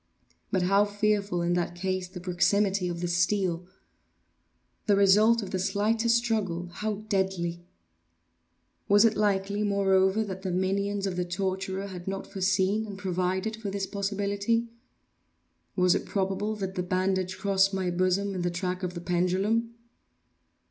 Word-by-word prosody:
But 185 -2 +1
how 195 +3 +4
fearful, 205 -3 0
in 175 +1 +1
that 175 0 -1
case, 185 0 -2
the 180 0 -9
proximity 185 +2 +1
of 170 0 -4
the 175 - -1
steel! 180 0 0 1.2
The 205 - +5
result 210 +3 +5
of 190 - -7
the 185 - -1
slightest 225 +4 +2
struggle 200 -7 -1
how 210 +3 -4
deadly! 190 -4 -1 1.3
Was 205 +2 +6
it 220 -2 +3
likely, 205 0 0
moreover, 195 0 +2
that 190 -3 -6
the 190 - -3
minions 195 +2 0
of 185 -2 -3
the 180 - +1
torturer 190 +2 -3
had 185 -2 -8
not 195 0 -3
foreseen 195 +2 0
and 200 -2 -7
provided 185 +3 -1
for 220 -2 -5
this 195 0 -2
possibility? 200 +3 -1 1.1
Was 180 -1 +4
it - - -2
probable 195 +2 -1
that 190 -2 -4
the 185 - -2
bandage 185 +1 -1
crossed 195 -1 +2
my 190 -2 -1
bosom 185 +3 +1
in 185 - -3
the 175 - 0
track 180 +1 -3
of 180 -1 -4
the 170 - -5
pendulum? 190 +7 0
195 Hz, 150 wpm, -28 LUFS, 180-205 Hz, 1.3 s, Was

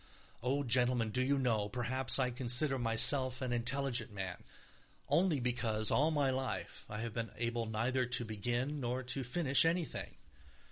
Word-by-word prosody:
Oh, 135 +4 -1
gentlemen, 120 -2 +2
do 130 - +2
you 140 +2 +1
know, 110 -6 0
perhaps 125 +2 +2
I 130 -2 +1
consider 130 +3 +1
myself 130 +3 +3
an 125 -2 -3
intelligent 125 0 -2
man, 95 -3 -6 0.6
only 170 -5 +2
because 120 -3 -1
all 150 +4 +3
my 145 -4 +1
life 130 0 -5
I 105 +1 -5
have 115 -1 -5
been 115 -1 -4
able 115 -1 -2
neither 120 +4 -1
to 125 -1 0
begin 120 +7 -3
nor 125 0 -3
to 130 +2 -1
finish 135 +2 +4
anything. 165 0 -2
125 Hz, 155 wpm, -34 LUFS, 115-135 Hz, 0.6 s, finish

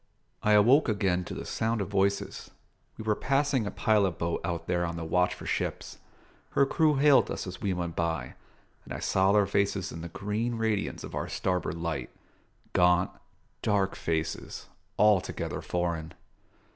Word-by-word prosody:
I 105 - +3
awoke 120 +7 +5
again 95 -4 +1
to - - -6
the - - -6
sound 115 +1 -1
of 100 - -2
voices. 100 0 0 0.5
We - - -6
were 110 -1 +2
passing 135 -1 +1
a - - -1
pilot 100 -6 +2
boat 85 0 -2
out 85 -1 -3
there 90 -1 0
on 85 -1 -2
the 85 -1 -5
watch 90 +3 +1
for - - -10
ships. - - -3 0.5
Her 140 - +4
crew 155 +1 +2
hailed 140 0 +5
us - - -4
as 90 -1 -8
we 100 - 0
went 85 -2 -3
by, 85 -1 -2 0.5
and - - -7
I - - -5
saw 95 +1 +2
their 105 0 +4
faces 100 -1 0
in 80 - -7
the 85 - -6
green 105 +6 -2
radiance 110 -3 -1
of - - -8
our - - -3
starboard 90 -3 -1
light 85 -1 -3 0.6
gaunt, 90 0 +4 0.5
dark 100 -2 +1
faces, 80 -1 -3 0.3
altogether 105 -3 +2
foreign. 85 -2 -2
95 Hz, 170 wpm, -28 LUFS, 85-110 Hz, 0.6 s, awoke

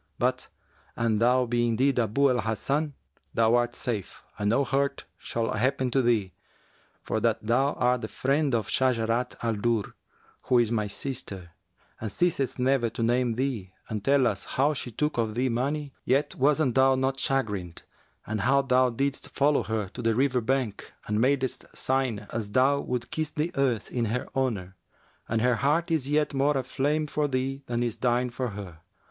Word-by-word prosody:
But, - - 0 0.5
an 115 -3 +1
thou 125 +2 +4
be 120 0 +1
indeed 125 +3 +2
Abu 125 +5 +3
al 125 - +1
Hasan, 140 +7 -1 0.4
thou 115 0 +4
art 120 0 +2
safe 110 -6 -4 0.2
and 105 0 +1
no 120 +6 +3
hurt 140 +1 -1
shall 115 -1 -3
happen 130 +3 0
to 135 - +3
thee, 110 -7 +1 0.7
for - - -1
that - - +1
thou 130 +6 +2
art 125 0 +1
the - - -3
friend 140 0 +1
of 110 -4 -1
Shajarat 120 -1 +1
al 115 -1 +1
Durr, 115 -1 0 0.5
who 125 - +3
is 120 -2 +3
my 105 -3 0
sister 100 -7 -6 0.5
and 110 -2 -4
ceaseth 165 - 0
never 125 -2 +2
to 115 +1 -4
name 120 +1 +2
thee 115 -7 -3 0.2
and 105 -3 -3
tell 135 0 +4
us 105 -5 -1
how 145 +4 +1
she 135 - -4
took 150 +3 -1
of 110 -2 -1
thee 130 +2 +1
money, 140 +4 -2
yet 135 +3 +1
wast 140 -1 +2
thou 130 +1 +5
not 135 +1 0
chagrined, 105 -12 -2 0.4
and 110 -1 -2
how 135 +5 +3
thou 130 -1 +3
didst 135 +4 -2
follow 145 -1 +2
her 110 -1 -2
to 125 - -7
the 115 -1 +1
river 130 0 +2
bank 125 -3 -2
and 105 +1 0
madest 130 0 +1
sign 130 -6 0
as 105 -3 -3
thou 135 +2 +4
wouldst 125 -3 -3
kiss 155 -1 -1
the 155 +3 -2
earth 130 -6 0
in 120 -2 0
her 115 +4 -2
honour; 105 -9 -1 0.5
and 110 0 +1
her 125 -1 +3
heart 150 +7 +1
is 145 -4 0
yet 150 0 +1
more 140 +1 +2
aflame 140 +4 0
for 150 0 -1
thee 135 0 -2
than 120 0 -1
is 120 -1 -2
thine 125 +1 +1
for 125 +1 -2
her. 100 -6 -8
125 Hz, 180 wpm, -27 LUFS, 115-135 Hz, 0.7 s, thou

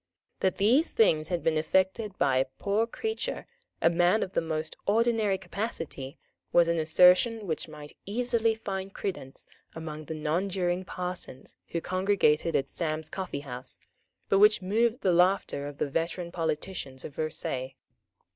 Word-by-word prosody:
That 190 -1 +1
these 245 - +4
things 155 -9 +3
had 175 -2 -1
been 160 -1 +2
effected 190 +5 0
by 135 -2 +3
a 130 - +3
poor 210 +3 +1
creature, 445 - -3 0.4
a - - +7
man 175 +5 +3
of 185 - -6
the - - +2
most 160 -1 -3
ordinary 220 -2 +2
capacity, 165 - -5 0.3
was 170 -1 +5
an 170 0 +1
assertion 180 +7 +5
which 160 -3 -3
might 150 -1 -11
easily 230 0 +1
find 195 -3 -5
credence 135 -9 -5 0.3
among 155 -1 -6
the 160 - -5
nonjuring 175 +3 -1
parsons 180 -8 -5
who 170 - -3
congregated 185 -4 +2
at 135 - +1
Sam's 155 -1 -3
Coffee 185 -7 -4
house, 125 -2 -6 0.5
but 195 - +3
which 210 +1 +6
moved 225 +5 +1
the 185 - +3
laughter 180 -5 +2
of 145 -1 -8
the - - 0
veteran 170 +4 -2
politicians 155 -4 -3
of 145 - -8
Versailles. 135 -4 -3
180 Hz, 150 wpm, -28 LUFS, 155-200 Hz, 0.5 s, a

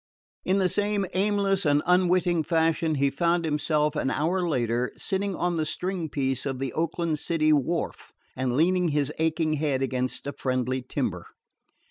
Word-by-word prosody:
In 190 - +1
the 190 -2 +3
same 205 +1 0
aimless 200 0 +1
and 145 -2 +2
unwitting 180 -1 +3
fashion, 160 0 +1
he 140 0 +2
found 170 +3 +1
himself, 150 -1 0
an 135 - 0
hour 165 +8 0
later, 120 -3 0
sitting 195 0 -1
on 175 0 -1
the 160 - +1
string 180 -1 -3
piece 135 -3 -1
of 135 -2 -3
the 135 -1 -3
Oakland 165 -1 -1
city 155 -2 +2
wharf 155 +4 -1 0.2
and 130 -1 -1
leaning 180 +3 +3
his 145 -1 0
aching 160 -1 +1
head 135 -4 0
against 130 0 -2
a 140 - -4
friendly 130 0 -1
timber. 125 - -3
160 Hz, 160 wpm, -26 LUFS, 140-180 Hz, 0.2 s, the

